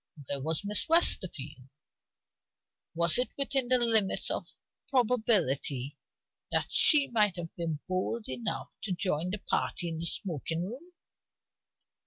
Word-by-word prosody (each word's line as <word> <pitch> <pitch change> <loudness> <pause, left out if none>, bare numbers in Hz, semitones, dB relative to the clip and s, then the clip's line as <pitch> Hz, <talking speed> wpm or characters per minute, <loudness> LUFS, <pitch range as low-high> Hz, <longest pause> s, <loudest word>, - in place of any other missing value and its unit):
Where 140 +1 -5
was 160 +6 -1
Miss 210 +10 +4
Westerfield? 155 - +2 1.3
Was 170 +5 +4
it 250 - +2
within 275 -2 +1
the 255 +1 +3
limits 225 -5 +2
of - - -4 0.4
probability 195 - +1 0.6
that - - -2
she 290 -3 +5
had 185 -6 0
been 165 -4 -4
bold 185 +5 -3
enough 130 +1 -5
to 195 - -3
join 175 -2 -2
the 205 - -3
party 175 -3 -2
in 160 -1 -6
the 170 - -1
smoking 165 - -3
room? 275 - -10
185 Hz, 125 wpm, -29 LUFS, 155-235 Hz, 1.3 s, she